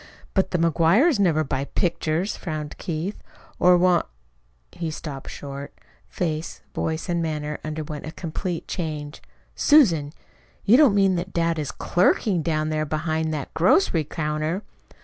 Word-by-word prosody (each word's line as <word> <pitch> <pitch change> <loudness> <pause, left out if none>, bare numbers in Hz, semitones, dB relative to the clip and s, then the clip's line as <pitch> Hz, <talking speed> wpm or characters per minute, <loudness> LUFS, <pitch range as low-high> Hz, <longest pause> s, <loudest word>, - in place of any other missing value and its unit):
"But 190 - +2
the 180 - 0
McGuires 170 - +3
never 165 -5 +3
buy 135 -1 -2
pictures," 170 +3 -1
frowned 155 -4 -5
Keith, 170 +4 -4 0.4
"or 180 0 +6
want 180 -1 +3 0.3
" - - -40
He 170 -2 -4
stopped 150 -3 -7
short. 140 0 -8 0.3
Face, 160 -2 -3
voice, 160 +2 -2
and 170 -2 0
manner 150 -2 -3
underwent 155 -1 -5
a - - -5
complete 170 +1 -4
change. 155 -4 -4 0.3
"Susan, 175 - +4 0.5
you 215 - +6
don't 265 -7 +6
mean 195 -2 +3
that 180 +2 -4
dad 165 -1 +1
is 150 - -3
CLERKING 180 0 +2
down 155 -1 0
there 155 0 0
behind 155 +1 -1
that 145 - -6
grocery 170 - +3
counter!" 155 +4 -2
160 Hz, 145 wpm, -24 LUFS, 155-180 Hz, 0.5 s, or